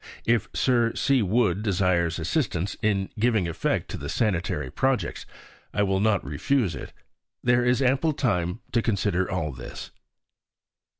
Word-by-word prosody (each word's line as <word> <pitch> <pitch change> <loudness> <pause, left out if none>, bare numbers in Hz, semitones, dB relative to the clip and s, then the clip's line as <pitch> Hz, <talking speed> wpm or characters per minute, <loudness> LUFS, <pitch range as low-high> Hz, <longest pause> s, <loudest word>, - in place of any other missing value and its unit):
If 115 -3 +2
Sir 120 -3 +2
C. 135 -3 +2
Wood 105 -2 +2
desires 90 -5 +1
assistance 90 - -1
in 100 -3 0
giving 110 -5 +2
effect 80 - -1
to - - -4
the - - -6
sanitary 85 - -1
projects, 135 -1 -1 0.5
I 105 - +3
will 95 -1 +1
not 105 -2 +2
refuse 95 - 0
it. 65 - -7 0.5
There 120 0 +3
is 125 +2 +2
ample 135 +5 +2
time 90 - -1
to 115 - +2
consider 100 -4 0
all 80 -4 -2
this. 60 -2 -9
105 Hz, 140 wpm, -26 LUFS, 90-120 Hz, 0.5 s, I